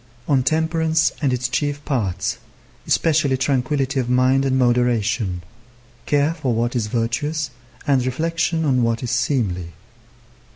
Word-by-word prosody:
On 140 -3 +3
temperance 160 +2 +1
and 140 -3 +2
its 125 0 0
chief 145 +2 -2
parts, 110 - -1 0.5
especially 150 -5 +2
tranquillity 135 +1 0
of 125 -2 -2
mind 130 +2 +3
and 130 -1 +1
moderation, 120 -6 +1 0.6
care 145 +2 +2
for 140 -8 -2
what 120 +2 -1
is 115 -3 0
virtuous, 130 +6 -1 0.3
and 135 -3 +2
reflection 165 +5 -1
on 130 -3 +2
what 115 +1 0
is 120 - -2
seemly. 105 - -1
130 Hz, 130 wpm, -21 LUFS, 120-145 Hz, 0.6 s, On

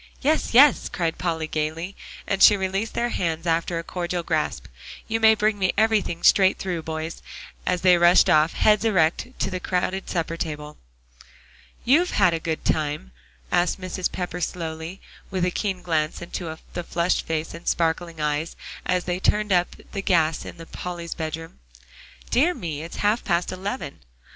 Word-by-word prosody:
"Yes, 300 -4 +1
yes," 280 +1 +6
cried 165 -3 -2
Polly 165 -3 -1
gaily, 155 +4 -3 0.3
and 195 - -1
she 210 - +8
released 195 +3 -2
their 240 0 0
hands 165 -5 -2
after 165 +1 0
a 165 - -3
cordial 175 0 -3
grasp. 155 - -1 0.4
"You 225 0 0
may 220 0 +6
bring 210 -1 +1
me 185 -1 +2
everything 210 -6 +1
straight 190 -1 +5
through, 180 -3 -3
boys," 160 +1 -5 0.5
as 180 -1 +1
they 180 -2 +5
rushed 175 +1 +6
off, 155 +2 +4
heads 210 -1 +3
erect, 185 -4 +2
to - - -1
the 185 - -3
crowded 185 +1 -2
supper 165 -1 -2
table. 150 -2 -5 1.1
"You've 325 +9 +4
had 180 -4 +5
a 165 - -1
good 160 0 -3
time?" 145 - -1 0.4
asked 175 +2 +2
Mrs. 185 0 -3
Pepper 180 -1 -4
slowly, 165 +1 -4 0.3
with 185 -2 0
a 180 - 0
keen 190 -2 -2
glance 155 -3 0
into 170 -2 -6 0.2
the 175 - -3
flushed 170 +1 0
face 160 0 -2
and 170 +1 -10
sparkling 165 0 0
eyes, 150 +2 -1 0.3
as 180 -1 +1
they 180 0 -2
turned 210 +2 +1
up 175 -1 +1 0.2
the 200 - -3
gas 165 -5 +1
in - - -8 0.2
Polly's 175 -2 -5
bedroom. 165 - -6 0.7
"Dear 325 +8 +3
me! 155 -4 -5
it 165 +2 -8
is - - -7
half 210 +3 +2
past 175 -2 0
eleven." 185 - -5
175 Hz, 170 wpm, -24 LUFS, 160-190 Hz, 1.1 s, she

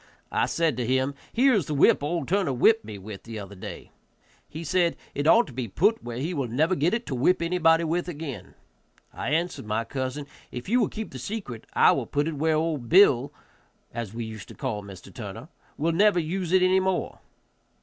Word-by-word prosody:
I - - +1
said 165 -6 0
to 120 -2 -2
him, 130 +2 +1 0.2
"Here 260 +3 +4
is 195 - +1
the 150 - -2
whip 140 - +5
old 155 -1 -2
Turner 185 -7 +1
whipped 220 - +4
me 105 - -8
with 100 0 -9
the 115 -1 -8
other 100 -1 -8
day." 95 - -9 0.6
He 160 +3 -7
said, 175 0 +1 0.2
"It 145 +1 -1
ought 230 +8 +6
to 135 - -12
be 125 -1 -3
put 205 - +1
where 120 -1 -6
he 155 +8 -2
will 140 -6 -2
never 155 +10 +1
get 175 +5 +2
it 240 +1 -4
to - - -4
whip 135 +9 +2
anybody 170 -1 +3
with 170 +2 -1
again." 145 - -7 0.6
I - - -4
answered 165 -6 -1
my 110 +2 0
cousin, 130 +4 -4 0.3
"If 125 -1 -7
you 240 +5 +3
will - - +2
keep 220 0 -6
the 130 - -8
secret 135 - -6
I - - +6
will - - -1
put 145 +1 0
it 165 - -2
where 155 +2 +1
old 155 -6 -1
Bill, 145 -8 +5 0.6
as 115 -4 -4
we 115 +1 -5
used 110 -2 -8
to - - -12
call 120 -7 -3
Mr. 95 -3 -12
Turner, - - -8 0.3
will 165 +3 +1
never 200 +2 +4
use 175 +2 -3
it 185 0 +5
any 185 +1 +4
more." 190 -1 -1
155 Hz, 215 wpm, -26 LUFS, 125-180 Hz, 0.6 s, ought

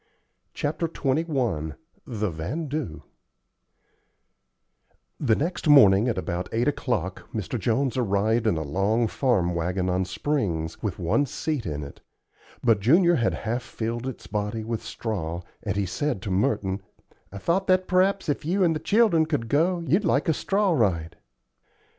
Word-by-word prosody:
CHAPTER 155 +3 -1
XXI 130 - -1 0.3
THE 110 -6 -2
"VANDOO" 130 - -4 2.2
The 115 -6 +3
next 165 +5 -2
morning 110 -7 +7
at 115 - -1
about 90 -1 -3
eight 115 +2 0
o'clock 110 - -2
Mr. 110 +3 -3
Jones 125 +4 0
arrived 110 0 +1
in 100 - +2
a 80 - -2
long 100 +10 +1
farm 105 -8 +1
wagon 90 +2 -1
on 95 +1 0
springs, 90 - -2
with 100 -5 -3
one 95 - +1
seat 145 - -3
in 75 -1 -3
it; 70 - -11 0.6
but 115 -4 +4
Junior 170 - +5
had 115 - +1
half 120 +3 -1
filled 120 +1 -4
its 130 - -7
body 105 +1 -3
with 115 0 -3
straw, 90 -6 -4 0.2
and 100 -2 -2
he 100 -1 0
said 145 - -2
to 100 - -3
Merton, 95 0 0 0.5
"I 100 - -7
thought 175 - 0
that 185 0 +3
p'raps, 190 +1 +2
if 145 - -1
you 185 +5 +1
and 165 -2 +3
the - - -2
children 200 -7 +3
could 130 -8 -2
go, 170 +5 +2
you'd 175 +9 +2
like 150 -4 +1
a 160 - +4
straw 200 +5 +1
ride." 90 - 0
115 Hz, 155 wpm, -25 LUFS, 95-150 Hz, 2.2 s, morning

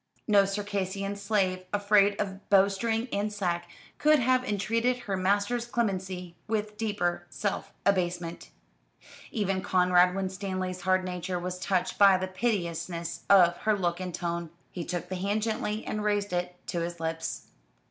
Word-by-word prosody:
No 205 -2 +5
Circassian 200 0 -2
slave, 200 -3 0
afraid 205 0 +3
of 195 -1 -4
bowstring 200 +4 +3
and 205 +1 0
sack, 175 -4 -2 0.3
could 305 0 +5
have 255 0 +2
entreated 230 +4 0
her 200 -5 -2
master's 205 +6 +1
clemency 185 -6 -2
with 210 -1 -2
deeper 205 -5 -1
self 200 +9 -3
abasement. 175 -3 0 0.8
Even 195 -3 -1
Conrad 180 -1 +4
Winstanley's 185 -1 -3
hard 185 -1 +2
nature 180 0 -3
was 180 +1 -4
touched 185 -1 -1
by 195 -2 +8
the 185 0 -2
piteousness 170 -5 -2
of 175 -3 +6
her 215 -1 +1
look 175 -2 -1
and 185 -1 -4
tone. 170 -1 -3 0.2
He 175 - -4
took 175 0 -4
the 185 0 -4
hand 200 +3 0
gently 215 -1 -2
and 210 -1 -3
raised 205 -2 0
it 180 0 -2
to 175 - -1
his 170 0 -4
lips. 160 0 -4
190 Hz, 145 wpm, -28 LUFS, 180-205 Hz, 0.8 s, by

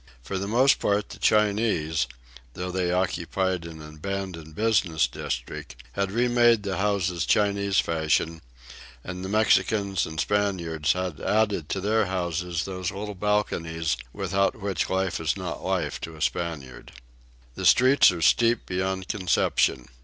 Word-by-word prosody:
For 95 +8 -3
the 100 - -3
most 125 +6 +4
part 100 0 0
the - - -10
Chinese, 100 - +2 0.5
although 90 0 -4
they 90 -1 0
occupied 90 0 -1
an 80 -2 -9
abandoned 80 -1 -6
business 95 -8 +2
district, - - -5 0.2
had 100 +3 -2
remade 120 -1 +3
the 95 -3 -2
houses 95 -4 0
Chinese 100 -1 +1
fashion, 80 0 0 0.6
and 90 0 -6
the 95 - -4
Mexicans 105 -2 +2
and 80 0 -6
Spaniards 85 -6 0
had 90 -5 -4
added 105 -7 +1
to 95 - -1
their 110 +1 +1
houses 90 -2 -2
those 95 -2 -3
little 105 +2 -5
balconies 85 -5 -1 0.2
without 100 - 0
which 100 -2 -2
life 95 -1 0
is 80 +3 -1
not 90 -3 -5
life - - -2
to 80 -1 -7
a 80 - -12
Spaniard. 80 -8 -4 0.6
The - - -7
hills 130 -1 +5
are 85 -2 -4
steep 115 +7 +3
beyond 95 0 -2
conception. 90 -9 +1
95 Hz, 140 wpm, -26 LUFS, 85-105 Hz, 0.6 s, hills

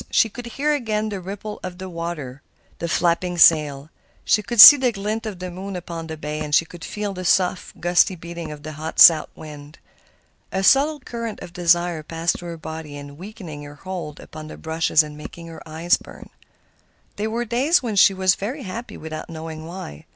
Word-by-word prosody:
She 225 - +3
could 240 +3 -9
hear 300 +2 +1
again 215 -6 -1
the 200 -3 -5
ripple 200 +3 -7
of 180 -1 -7
the 190 +1 -7
water, 165 -6 -6 0.4
the 170 - -3
flapping 175 +1 0
sail. 150 -3 +4 0.3
She 215 - +3
could 235 +2 -5
see 290 - +14
the 260 -3 +1
glint 215 +2 -4
of 205 -4 -6
the 180 0 -6
moon 190 +2 -7
upon 170 -2 -6
the 160 -1 -7
bay, 150 0 -5
and 150 -1 +2
could 175 0 -12
feel 210 -1 -4
the 185 -1 -6
soft, 180 0 0
gusty 175 +2 +3
beating 170 -1 -8
of 150 -1 -10
the 155 - -6
hot 155 +2 -7
south 160 -3 +8
wind. 150 -1 -11 0.7
A 190 - -2
subtle 285 +7 +4
current 230 -3 -6
of 170 - -10
desire 175 -1 +1
passed 165 +2 -2
through 175 - -8
her 170 - -7
body, 160 -2 -8
weakening 175 -2 -10
her 145 0 -10
hold 175 -2 -7
upon 155 0 -10
the - - -10
brushes 160 -1 +2
and 150 -1 -9
making 170 +3 -10
her 165 -1 -10
eyes 165 +3 +1
burn. - - -14 0.9
There 215 +2 -2
were 235 +2 -2
days 265 +8 +2
when 225 -4 -3
she 195 0 +5
was 185 -1 +3
very 255 +10 -5
happy 225 +5 -7
without 155 +1 -7
knowing 160 -1 -8
why. 165 - -9
175 Hz, 195 wpm, -22 LUFS, 160-205 Hz, 0.9 s, see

